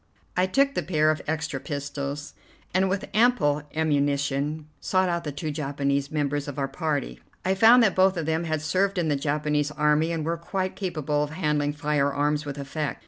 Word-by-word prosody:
I 180 +1 +2
took 275 +8 +2
the - - 0
pair 155 -1 +2
of 155 - -3
extra 155 -2 -2
pistols, 140 0 -5 0.4
and, 190 +1 +3
with 190 +1 -2
ample 215 -11 +3
ammunition, 145 0 0
sought 185 -1 +1
out 170 -1 -2
the 150 - -2
two 150 +2 -4
Japanese 140 -1 -1
members 145 -2 -1
of 145 -1 -6
our 135 -1 0
party. 140 - -2 0.3
I 190 - +3
found 230 +5 +7
that 210 - +3
both 190 0 +3
of 165 - -2
them 160 +2 0
had 155 -2 -2
served 195 +4 +1
in 170 -3 +1
the 145 - +2
Japanese 150 +1 0
army 150 +2 +2
and 160 -2 -2
were 165 +1 -1
quite 185 +2 -3
capable 155 -6 -1
of 150 - -1
handling 150 -2 0
firearms 145 0 0
with 145 0 -5
effect. 145 +1 -3
150 Hz, 190 wpm, -26 LUFS, 145-170 Hz, 0.4 s, found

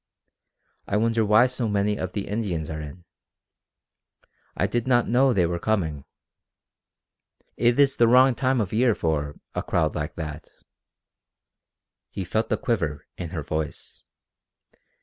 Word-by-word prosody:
"I 100 - 0
wonder 115 +1 +2
why 110 +3 +5
so 125 -2 -2
many 105 0 +1
of 95 -2 -5
the 100 - -4
Indians 90 -8 -3
are 80 0 -5
in? 80 +4 -10 1.5
I - - +2
did 120 +1 -2
not 120 -2 +3
know 130 +3 +4
they 95 -7 +2
were 85 0 -2
coming. 80 -10 -1 1.5
It 120 +3 +2
is 140 -1 +4
the 120 - +5
wrong 130 +2 +6
time 130 +1 0
of 105 -3 -2
year 115 0 +3
for 75 -3 -1 0.2
a - - -2
crowd - - 0
like - - -4
that!" 75 -1 -7 1.6
He 95 - -5
felt 110 +5 -1
the - - +1
quiver 85 - -2
in 85 -2 -6
her 80 -3 -5
voice. 80 0 -5
105 Hz, 145 wpm, -25 LUFS, 80-120 Hz, 1.6 s, wrong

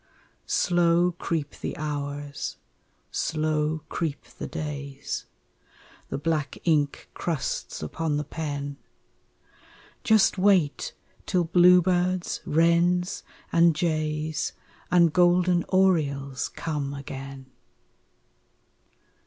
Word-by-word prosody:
Slow 175 0 +3
creep 165 -4 -3
the - - -4
hours, 145 -1 -4 0.5
slow 155 0 0
creep 160 -5 -3 0.2
the - - -4
days, 145 -3 -5 0.8
The - - -2
black 150 0 -1
ink 150 -4 +1
crusts 160 - -3
upon 150 - -2
the 150 - -1
pen 145 -2 -4 1.3
Just 220 -3 +4
wait 185 -7 +2 0.3
till 180 -1 +2
bluebirds, 180 +1 +3
wrens, 170 +3 +2 0.3
and 170 -1 +5
jays 155 -1 -1 0.4
And 170 -3 +4
golden 175 0 +4
orioles 140 -9 +1
come 145 -3 -3
again! 135 -1 -8
160 Hz, 85 wpm, -26 LUFS, 145-175 Hz, 1.3 s, and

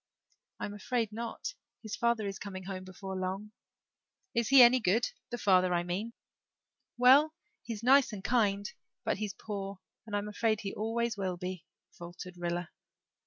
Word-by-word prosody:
"I'm 205 - -4
afraid 225 +2 -1
not. 230 - -5 0.3
His 215 -2 -4
father 235 -2 +1
is 195 -1 -4
coming 190 -2 -6
home 185 0 -5
before 190 +1 -7
long." 190 +3 -3 0.8
"Is 235 -1 +1
he 270 -2 +9
any 245 +2 +7
good 225 +2 +2 0.2
the 240 - -3
father, 185 -4 +4
I 175 - +1
mean?" 195 +7 -3 0.8
"Well 275 +6 +6 0.3
he's 225 -3 -6
kind 270 +3 +7
and 200 -3 -7
nice 205 -4 +1 0.3
but - - +1
he's 210 -2 -3
poor 200 -2 -5 0.3
and 205 - -3
I'm 205 0 -1
afraid 215 +1 0
he 195 - -4
always 225 +1 -1
will 185 -2 -2
be," 180 -1 -6 0.3
faltered 175 +1 -9
Rilla. 175 0 -3
205 Hz, 160 wpm, -31 LUFS, 185-235 Hz, 0.8 s, he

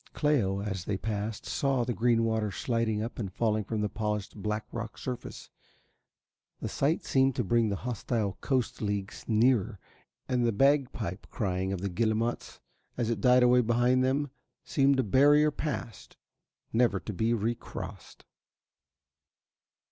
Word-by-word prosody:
Cléo, 105 -10 +1
as 95 -4 -4
they 100 - -1
passed, 105 +1 -4
saw 135 -4 0
the 120 - -2
green 115 0 +2
water 110 -2 0
sliding 110 0 -1
up 115 - -6
and 100 -5 -3
falling 110 +1 0
from 110 +1 -3
the 105 - +1
polished 105 -1 -3
black 105 +1 -3
rock 115 -1 -6
surface. 125 -2 -6 1.1
The - - -3
sight 150 +4 0
seemed 135 -1 +2
to 125 - 0
bring 115 +2 +2
the 100 - -1
hostile 115 -4 -2
coast 130 -4 -1
leagues 100 -1 -3
nearer 115 -2 +2 0.5
and 125 -1 +1
the 120 - +3
bagpipe 125 -6 +1
crying 95 -3 -2
of 95 -2 -3
the 100 - -1
guillemots 110 +5 -1 0.4
as 120 -2 0
it 110 -4 -2
died 125 +1 +5
away 125 0 +5
behind 120 +2 +2
them 135 +2 0 0.3
seemed 135 -1 +3
a - - +3
barrier 145 +7 +5
passed, 145 -6 -5 0.6
never 120 +1 +3
to 105 - -6
be 110 +5 +1
re 115 +2 0
crossed. - - -9
115 Hz, 150 wpm, -29 LUFS, 105-125 Hz, 1.1 s, died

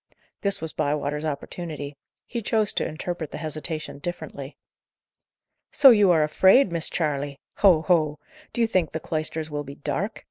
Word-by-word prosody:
This 200 -4 -1
was 160 -1 -5
Bywater's 150 0 -1
opportunity; 145 -1 -5 0.3
he 235 - -4
chose 215 0 +1
to - - 0
interpret 165 0 -5
the - - -7
hesitation 155 -1 -5
differently. 150 -4 -6 1.1
"So 275 -2 +8
you 210 -4 +5
are 160 -3 +5
afraid, 190 - +5
Miss 170 -1 +1
Charley! 145 -3 -2 0.2
Ho! 175 -6 +5
ho! 155 -3 +2 0.3
Do 235 - -2
you - - +5
think 185 -8 0
the 160 - -2
cloisters 155 0 -3
will 145 0 -3
be 140 0 -9
dark? 200 +8 -3
155 Hz, 155 wpm, -25 LUFS, 150-180 Hz, 1.1 s, So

